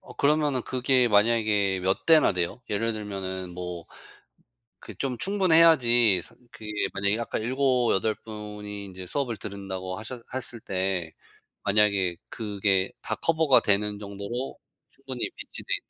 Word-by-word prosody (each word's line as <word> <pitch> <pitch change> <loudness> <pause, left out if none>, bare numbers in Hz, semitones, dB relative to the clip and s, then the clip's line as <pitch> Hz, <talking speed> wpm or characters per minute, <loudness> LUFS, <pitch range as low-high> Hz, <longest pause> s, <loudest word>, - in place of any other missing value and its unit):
어 - - -14
그러면은 145 -3 +2
그게 130 0 +2
만약에 105 -3 +2
몇 95 +1 -1
대나 160 -8 +6
돼요? 90 +7 -2
예를 115 +2 0
들면은 95 -4 -5
뭐 90 -1 -6 0.9
그 - - -11
좀 130 -3 -2
충분해야지 160 - +5
사 - - -16 0.2
그게 110 - -11 0.3
만약에 100 +2 +1
아까 115 - -3
7-8 120 -3 +1
분이 105 -1 -7
인제 95 -1 -9
수업을 125 +1 -2
들은다고 95 -2 -6
하셨 115 +3 -7
했을 125 -2 -3
때 95 -4 -2 0.5
만약에 100 -3 +2
그게 100 -3 0
다 - - -3
커버가 160 -4 +4
되는 105 0 +1
정도로 100 +5 -5 0.3
충분히 135 -2 -5
비치돼 - - -8
있 - - -4
105 Hz, 275 characters per minute, -26 LUFS, 95-125 Hz, 0.9 s, 대나